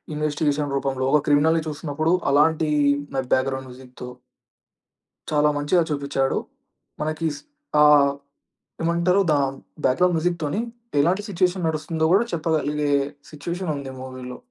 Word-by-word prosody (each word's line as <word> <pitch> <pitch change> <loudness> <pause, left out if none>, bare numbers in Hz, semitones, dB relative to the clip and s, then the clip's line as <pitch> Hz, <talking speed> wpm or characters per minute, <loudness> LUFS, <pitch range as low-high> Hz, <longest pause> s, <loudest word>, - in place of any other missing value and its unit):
Investigation 150 -1 -1
రూపంలో, 135 -1 -2
ఒక 150 - +5
criminal 155 +3 +4
చూస్తున్నప్పుడు 155 +2 -1 0.2
అలాంటి 155 +2 +3 0.5
మె 135 - +1
బ్యాక్‌గ్రౌండ్ 130 0 0
మ్యూజిక్‌తో... 125 0 -10 1.2
చాలా 150 0 +3
మంచిగా 150 +5 +2
చూపించాడు. 140 -2 0 0.6
మనకి 155 +2 -2
స్ - - -11 0.4
ఆహ్, 145 -2 +6 0.7
ఏమంటారు? 170 +3 +2
దాని 135 -2 +1 0.3
బ్యాక్‌గ్రౌండ్ 175 +7 +3
మ్యూజిక్‌తోని 170 +1 -1 0.4
ఎలాంటి 180 +7 +2
మూవీలో. 180 +1 +1
నడుస్తుందో 160 +1 -1
కూడా 210 +5 +4
చెప్పగలిగే 150 -2 0 0.4
సిట్యుయేషన్ 170 +3 -4
ఉంది 135 -1 -7
మూవీలో. 130 -1 -8
150 Hz, 110 wpm, -23 LUFS, 140-165 Hz, 1.2 s, ఆహ్